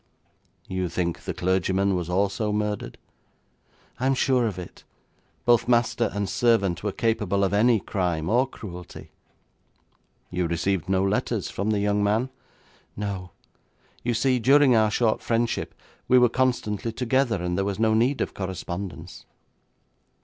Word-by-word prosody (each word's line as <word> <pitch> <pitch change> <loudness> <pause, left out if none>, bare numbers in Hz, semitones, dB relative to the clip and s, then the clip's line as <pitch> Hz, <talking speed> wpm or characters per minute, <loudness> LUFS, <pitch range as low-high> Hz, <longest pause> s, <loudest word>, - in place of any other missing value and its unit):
'You 95 -1 -2
think 85 0 -2
the - - -2
clergyman 95 +2 +1
was 90 -2 -2
also 100 +3 0
murdered?' 105 -1 -2 1.0
'I 130 - -1
am 135 - +3
sure 130 -2 +2
of 100 -4 -4
it. 90 -1 -9 0.6
Both 120 -1 +4
master 120 -1 +2
and 100 0 -2
servant 100 -3 +2
were 105 - -2
capable 105 -2 0
of 95 - +1
any 115 +2 +4
crime 90 -5 -2
or 125 +6 +3
cruelty.' 90 -9 -10 1.2
'You 90 -1 -1
received 85 +1 -1
no 95 0 +2
letters 100 +2 -1
from 100 +3 -2
the 105 -1 +1
young 105 0 +1
man?' 110 +6 +1 0.7
'No. 100 -3 -4 0.7
You 120 -1 -1
see, 130 +2 +2
during 135 +1 +5
our 110 -1 +4
short 110 +1 +1
friendship 115 0 -1 0.3
we 125 - +5
were 125 -1 +5
constantly 120 -4 0
together, 125 -2 0
and 90 0 -1
there 95 - 0
was 100 0 -2
no 110 0 +2
need 120 +5 +2
of - - -2
correspondence.' 95 -1 -6
105 Hz, 145 wpm, -25 LUFS, 95-120 Hz, 1.2 s, during